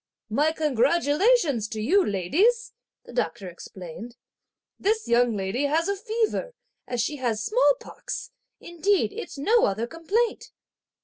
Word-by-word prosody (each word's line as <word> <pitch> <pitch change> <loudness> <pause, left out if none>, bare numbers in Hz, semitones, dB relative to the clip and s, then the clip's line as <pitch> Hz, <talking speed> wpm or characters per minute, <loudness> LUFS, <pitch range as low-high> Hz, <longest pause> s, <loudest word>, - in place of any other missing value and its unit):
"My 295 +8 +2
congratulations 300 - +2
to 220 -1 -6
you, 370 - +3
ladies," 410 - +1 0.3
the - - -12
doctor 205 -6 -2
explained; 180 +5 -9 0.6
"this 435 +2 0
young 235 -2 +3
lady 200 +8 -1
has 320 +5 +1
fever, 465 +2 -1 0.3
as 245 - -3
she 295 +6 -2
has 230 -5 -1
small - - +4
pox; 475 - -7 0.3
indeed 345 - 0
it's - - -7
no 440 +12 +3
other 210 +4 -1
complaint!" 385 - -2
295 Hz, 125 wpm, -25 LUFS, -, 0.6 s, small